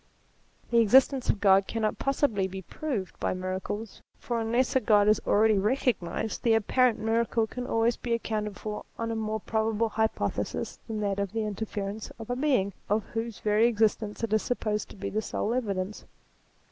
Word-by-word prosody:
The 235 - +5
existence 260 +3 +4
of 210 - +2
God 195 -1 +5
cannot 220 -2 -1
possibly 270 -8 +1
be 190 0 -7
proved 225 - -4
by - - -1
miracles, 185 +4 -4 0.2
for 235 -1 -2
unless 235 +4 +1
a - - +6
God 210 -4 +4
is 215 0 +4
already 215 -1 +4
recognized, 220 -3 -1
the 230 -2 +4
apparent 240 +2 +3
miracle 225 +1 +1
can 250 +3 -6
always 225 0 +2
be 235 - -2
accounted 210 -3 -3
for 210 -1 -5
on 230 0 -2
a - - -2
more 220 0 -2
probable 220 +1 0
hypothesis 220 +1 -2
than 220 -2 -3
that 200 -1 -1
of 200 -1 -2
the 225 -1 -1
inter 210 +1 -3
ference 205 +1 -5
of 225 +1 -7
a - - 0
Being 255 -8 +1 0.2
of 210 +1 +2
whose 225 -1 -4
very 215 +2 +4
existence 220 -1 0
it 220 -2 -1
is 215 - +3
supposed 215 -4 -2
to - - -12
be 200 0 -5
the 215 +2 0
sole 220 +1 -2
evidence. 205 -5 -2
220 Hz, 185 wpm, -28 LUFS, 205-230 Hz, 0.2 s, a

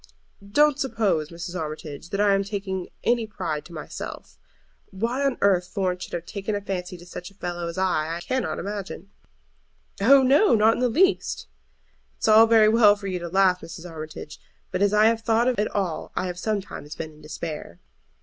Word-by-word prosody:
"Don't 290 +8 +3
suppose, 205 - 0
Mrs. 175 +1 -7
Armitage, 155 -1 -6
that 200 - -3
I 205 -1 +4
am 195 0 +2
taking 195 -2 -4 0.2
any 235 -2 +1
pride 170 -8 -4
to - - -13
myself. 155 - -8 0.5
Why 235 +8 -2
on 275 -2 +1
earth 185 -3 +3
Florence 185 -1 -2
should - - -10
have 170 - -4
taken 200 +2 -4
a 205 - -2
fancy 180 -2 -4
to 175 - -14
such 180 0 -8
a 195 - -23
fellow 175 -2 -4
as 170 - -6
I 185 -5 +1
am 165 - -3
I - - -5
cannot 255 +8 -2
imagine." 200 -2 -6 0.9
"Oh 270 +6 +7
no; 285 - +5
not 220 +1 +5
in - - -4
the 250 0 +2
least." 370 - +1 0.7
"It's - - -2
all 220 +1 +8
very 225 -1 +6
well 215 -2 +6
for 205 -1 -11
you 185 -2 -2
to 170 0 -6
laugh, 185 0 +3
Mrs. 165 +1 -9
Armitage, 155 -2 -8 0.3
but 185 - -2
as 200 0 +4
I 210 +1 +5
have 225 0 +3
thought 225 +2 +2
of 250 -4 +1
it 210 - +2
all 185 -5 -3
I - - -1
have 180 -1 -5
sometimes 195 -7 -4
been 160 -1 -6
in 155 0 -18
despair." 150 - -7
195 Hz, 200 wpm, -25 LUFS, 175-220 Hz, 0.9 s, all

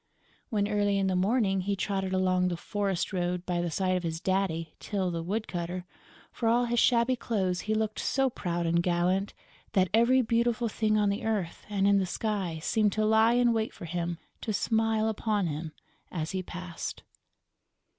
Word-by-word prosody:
When, 205 -2 +1
early 205 -1 +1
in 195 - +1
the 190 -1 +1
morning, 195 0 +2
he 200 +2 -1
trotted 195 -1 -2
along 185 -1 +2
the 175 -1 -2
forest 195 0 -2
road 180 0 -1
by 175 -1 0
the 175 - -1
side 185 +2 0
of 180 - 0
his 165 -1 -3
daddy, 185 -3 -1
Tyl 190 -4 -2
the 165 -1 -3
woodcutter, 180 -2 -3 0.5
for 230 - 0
all 240 +1 +3
his 240 0 +1
shabby 240 +1 +4
clothes 195 -7 -1
he 215 +3 -1
looked 215 0 -1
so 270 0 +1
proud 175 -8 -2
and 170 +1 +2
gallant 180 +3 0 0.4
that 185 -2 +3
every 245 +3 +5
beautiful 235 +1 +1
thing 215 0 +1
on 205 -1 +3
the 200 - -3
earth 205 -6 -2
and 200 -1 +1
in 200 0 +5
the 190 - 0
sky 195 -4 -2
seemed 210 -1 +2
to 215 0 +1
lie 220 +2 +5
in 240 -1 +4
wait 220 -1 -1
for - - -8
him 170 0 -3 0.2
to 220 - -2
smile 220 0 +1
upon 215 -2 0
him 155 0 -4 0.4
as 160 -3 -3
he 190 -1 -2
passed. 180 -1 -6
195 Hz, 185 wpm, -29 LUFS, 180-220 Hz, 0.5 s, every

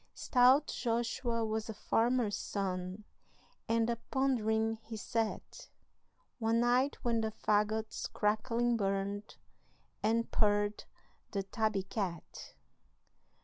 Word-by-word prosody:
Stout 260 +3 +5
Joshua 235 0 -1
was 220 0 -2
a 220 - -5
farmer's 230 0 +1
son, 185 0 -3 0.7
And 230 0 +2
a 235 -1 0
pondering 225 -4 +1
he 220 0 -7
sat 225 +1 -3 0.7
One 225 0 +2
night 250 +3 +2
when 230 -2 +1
the 220 - 0
fagots 215 +1 0
crackling 230 +3 +1
burned, 200 +1 -2 0.7
And 230 +2 +1
purred 205 0 +1 0.4
the 200 -1 -2
tabby 215 -1 -1
cat. 190 -4 -5
220 Hz, 105 wpm, -33 LUFS, 205-235 Hz, 0.7 s, Stout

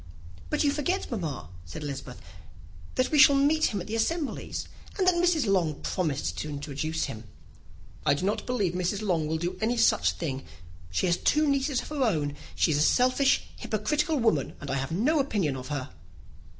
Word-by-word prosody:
"But 300 - +1
you 285 - +3
forget, 310 +5 -1
mamma," 150 - -4
said 85 - -8
Elizabeth, 135 -3 -6 0.8
"that 255 - +1
we 300 - +3
shall 280 0 +8
meet 300 +3 +3
him 205 - 0
at 175 - -5
the 220 - -6
assemblies, 295 +6 -2 0.3
and 380 - +2
that 365 - +5
Mrs. 345 -4 +2
Long 180 -7 +2
has - - -5
promised 135 - -1
to 150 - -4
introduce 150 +2 -3
him." 115 -5 -5 0.8
"I 145 - +3
do 160 - -3
not 205 - -1
believe 210 -9 0
Mrs. 185 +3 -1
Long 170 -6 +1
will 160 +1 -1
do 175 +3 -3
any 235 +3 +1
such 225 -1 +3
thing. 135 -5 -4 0.5
She 85 - 0
has 175 -1 +2
two 305 +9 +2
nieces 275 -1 +1
of - - -10
her 300 -2 -3
own. 155 - +1 0.2
She - - +3
is 145 - +2
a - - +2
selfish, 255 - +3
hypocritical 300 - 0
woman, 220 - +1
and - - -5
I 140 - 0
have 135 +2 -3
no 260 - +2
opinion 205 - 0
of 130 -1 -7
her." 145 -6 -4
195 Hz, 195 wpm, -28 LUFS, -, 0.8 s, shall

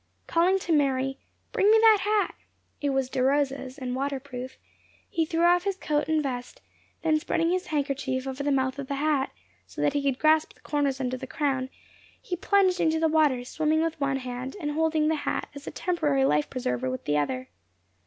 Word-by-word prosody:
Calling 355 +3 +3
to 360 -3 -4
Mary, 270 -2 +1 0.3
"Bring 415 -4 +3
me 440 - +7
that 440 -2 +6
hat" 420 +1 +1 0.5
(it 290 - +1
was 270 -1 0
De 255 - -2
Rosa's, 270 -1 0
and 255 -2 -4
water 275 +1 -2
proof), 260 -1 -8 0.5
he 325 -1 -1
threw 330 +1 0
off 350 +1 +5
his 395 -1 -1
coat 300 -5 -1
and 315 -1 +1
vest, 250 -2 -5 0.4
then 315 -1 +3
spreading 330 +1 0
his 370 0 -1
handkerchief 275 -3 -1
over 265 +1 -4
the 285 0 0
mouth 265 0 0
of 275 - -5
the 280 - -2
hat, 290 -1 +1 0.4
so - - -11
that 285 - +2
he 290 - 0
could 275 -2 0
grasp 310 +1 +3
the - - -26
corners 285 -3 -1
under 255 -1 -2
the 260 +1 -7
crown, 265 -2 -1 0.5
he 420 -8 -4
plunged 375 0 +2
into 320 0 +2
the 320 - +3
water, 305 -6 +3
swimming 315 +4 0
with 325 -2 -3
one 275 -1 +1
hand, 255 0 -5
and 295 -4 -2
holding 315 0 +1
the 320 - +2
hat - - -3
as 285 0 -10
a - - -3
temporary 300 -7 +1
life 150 - +2
preserver 130 - -2
with 130 0 -5
the 150 0 +2
other. 130 -3 -2
285 Hz, 205 wpm, -27 LUFS, 260-320 Hz, 0.5 s, me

